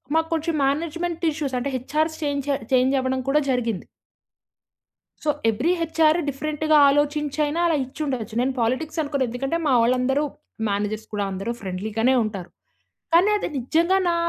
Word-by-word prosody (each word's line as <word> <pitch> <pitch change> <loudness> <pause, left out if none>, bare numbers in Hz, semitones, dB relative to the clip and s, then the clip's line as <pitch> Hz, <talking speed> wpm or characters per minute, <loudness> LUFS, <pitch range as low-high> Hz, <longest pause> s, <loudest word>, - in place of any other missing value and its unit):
మాకు 320 0 +2
కొంచెం 325 0 -1
management 335 +4 -2
issues 290 -4 -3
అంటే, 265 +3 -2
హెచ్ఆర్స్ 310 +5 -1
చేంజ 285 -2 -1 0.3
చేంజ్ 255 +1 +4
అవ్వడం 260 0 -1
కూడా 295 +2 +4
జరిగింది. 235 -6 -1 1.4
సో, 300 - +3 0.2
ఎవ్రి 245 +11 +1
హెచ్ఆర్ 320 0 +3
డిఫరెంట్‌గా 305 +2 0
ఆలోచించైనా 295 +2 +1
అలా 330 - +2
ఇచ్చి 260 +4 -14
ఉండచ్చు. 240 -7 -3
నేను 260 +2 +1
పాలిటిక్స్ 260 +8 -1
అనుకోను, 285 -3 -1
ఎందుకంటే 270 +7 -2
మా 280 - +3
వాళ్ళందరూ 255 +4 +2 0.5
మేనేజర్స్ 205 +2 -2
కూడా 205 -1 -1
అందరూ 195 +4 -4
ఫ్రెండ్లీ 190 +2 -4
గానే 255 +4 +4
ఉంటారు. 195 -4 -5 0.7
కానీ, 360 +5 +6
అది - - -3
నిజంగా 335 +9 +2
నా - - +1
280 Hz, 145 wpm, -23 LUFS, 245-315 Hz, 1.4 s, కానీ